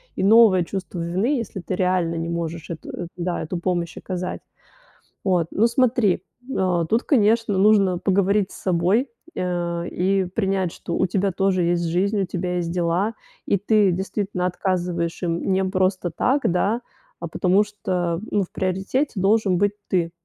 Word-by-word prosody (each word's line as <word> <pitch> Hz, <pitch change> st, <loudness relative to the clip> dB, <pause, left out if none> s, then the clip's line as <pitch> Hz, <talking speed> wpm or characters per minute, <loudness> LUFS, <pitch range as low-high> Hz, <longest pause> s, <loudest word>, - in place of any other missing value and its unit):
и -, -, -2 dB
новое 205 Hz, -3 st, +6 dB
чувство 185 Hz, 0 st, -5 dB
вины, 190 Hz, -, 0 dB
если 230 Hz, -4 st, -5 dB
ты 185 Hz, +1 st, -4 dB
реально 180 Hz, -2 st, +1 dB
не 165 Hz, 0 st, -3 dB
можешь 170 Hz, -1 st, -4 dB
эту 165 Hz, -, -7 dB
эт 175 Hz, -, -5 dB
да, 175 Hz, 0 st, -2 dB
эту 170 Hz, +2 st, -4 dB
помощь 175 Hz, -1 st, -2 dB
оказать. 185 Hz, -1 st, -4 dB, 0.8 s
Вот, 180 Hz, -4 st, +1 dB
ну, 225 Hz, +3 st, +3 dB
смотри, 235 Hz, -6 st, +2 dB, 0.3 s
э, 180 Hz, -7 st, +1 dB
тут, 225 Hz, +3 st, +2 dB
конечно, 225 Hz, -5 st, +2 dB
нужно 195 Hz, -2 st, +4 dB
поговорить 200 Hz, +1 st, +1 dB
с -, -, -11 dB
собой, 185 Hz, +8 st, +1 dB, 0.3 s
э, 175 Hz, -1 st, -2 dB
и 190 Hz, +1 st, +1 dB
принять, 190 Hz, -1 st, -1 dB
что 170 Hz, -, -5 dB
у -, -, +2 dB
тебя 195 Hz, +2 st, 0 dB
тоже 190 Hz, 0 st, +1 dB
есть 170 Hz, 0 st, +1 dB
жизнь, 195 Hz, +5 st, +1 dB
у -, -, +1 dB
тебя 180 Hz, 0 st, -3 dB
есть 170 Hz, -1 st, -2 dB
дела. 175 Hz, +5 st, 0 dB, 0.3 s
И 200 Hz, -, +2 dB
ты 205 Hz, 0 st, +3 dB
действительно 190 Hz, 0 st, -2 dB
отказываешь 175 Hz, -2 st, -2 dB
им 170 Hz, +2 st, 0 dB
не 190 Hz, +1 st, +2 dB
просто 185 Hz, -1 st, 0 dB
так, 260 Hz, -, +1 dB
да, 205 Hz, +7 st, +1 dB, 0.4 s
а -, -, -3 dB
потому 190 Hz, +2 st, +3 dB
что, 180 Hz, -5 st, -2 dB
ну, 205 Hz, -, +2 dB
в 180 Hz, -, -11 dB
приоритете 190 Hz, +9 st, -1 dB
должен 200 Hz, -2 st, +3 dB
быть 205 Hz, +2 st, +2 dB, 0.2 s
ты. 170 Hz, -3 st, 0 dB
185 Hz, 165 wpm, -23 LUFS, 175-200 Hz, 0.8 s, новое